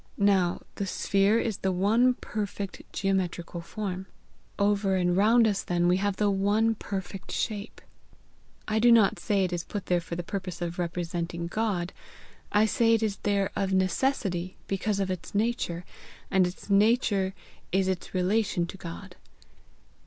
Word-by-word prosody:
Now 195 -4 +2
the 200 - -2
sphere 200 +3 +2
is 225 -3 -1
the 190 - 0
one 225 +7 +3
perfect 200 -4 -5
geometrical 180 -3 -1
form. 190 0 -5 0.5
Over 200 -1 +2
and 180 -1 +2
round 225 +4 +5
us 200 -2 0
then 175 0 +1
we 180 +1 +4
have 200 0 0
the 205 0 +2
one 205 +3 +2
perfect 195 -2 -6
shape. 210 0 -3 0.9
I 215 +1 +1
do 240 +2 +6
not 225 -4 +5
say 200 -3 +1
it 180 -1 -1
is 175 -1 -2
put 205 -3 -5
there 175 -1 +1
for 170 0 -6
the 175 - -4
purpose 185 -1 -5
of 175 0 -4
representing 170 0 -3
God; 185 -2 -1 0.6
I 210 +1 +4
say 230 +1 +3
it 225 - 0
is 205 -3 -1
there 200 -1 0
of 195 -1 0
necessity, 185 -1 0
because 200 +1 -1
of 190 -1 0
its 185 +2 -6
nature, 205 -6 -1 0.5
and 190 -2 +4
its 180 - -9
nature 200 -2 +3 0.4
is 190 0 +2
its 185 -2 -2
relation 185 -1 +1
to 175 - -9
God. 180 +1 -9
195 Hz, 160 wpm, -28 LUFS, 180-210 Hz, 0.9 s, do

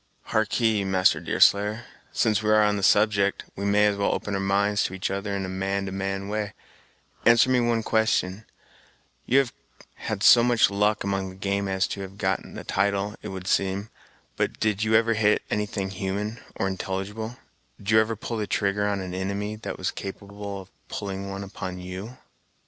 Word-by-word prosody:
"Harkee, 110 -1 +2
Master 95 -1 +3
Deerslayer, 105 +4 +3 0.3
since 110 -2 +2
we 110 - -1
are 110 0 +6
on 105 0 +2
the 100 - -2
subject, 100 0 +3
we 100 - -4
may 105 +1 +4
as 105 -1 +2
well 100 - +1
open 105 - -4
our 100 - 0
minds 100 +1 +1
to 95 - -3
each 95 - -2
other 100 +1 -2
in 95 -1 -2
a - - -5
man 95 +1 -2
to 95 - -4
man 95 0 -3
way; 105 -1 -3 0.7
answer 120 +2 +5
me 125 - +4
one 120 -1 +1
question; 110 -3 +1 0.8
you 130 - +4
have 135 -3 +2 0.4
had - - -4
so 120 - +8
much 120 -3 +4
luck 105 +1 +1
among 95 -1 -1
the 95 - -11
game 100 +1 -1
as 95 +1 +1
to 100 - -4
have 95 0 -8
gotten - - -2
a - - -6
title, 100 +1 0
it - - -7
would 95 -1 -6
seem, 95 +2 0 0.5
but - - -1
did 105 -2 +1
you 110 0 +2
ever 115 +1 +4
hit 105 -1 +2
anything 100 -2 -2
human 100 +4 -3 0.2
or 95 - -1
intelligible: 95 +5 -4 0.4
did 100 0 -4
you 110 - +7
ever 110 +1 +1
pull 110 +1 -3
trigger 100 +1 +1
on 100 -1 -1
an 90 -1 -5
inimy 100 +3 -3
that 110 - -6
was 95 - -1
capable 100 0 -7
of 95 - -16 0.2
pulling 100 -1 -5
one 100 0 -5
upon 95 -2 -6
you?" 95 +7 -7
100 Hz, 190 wpm, -25 LUFS, 95-110 Hz, 0.8 s, so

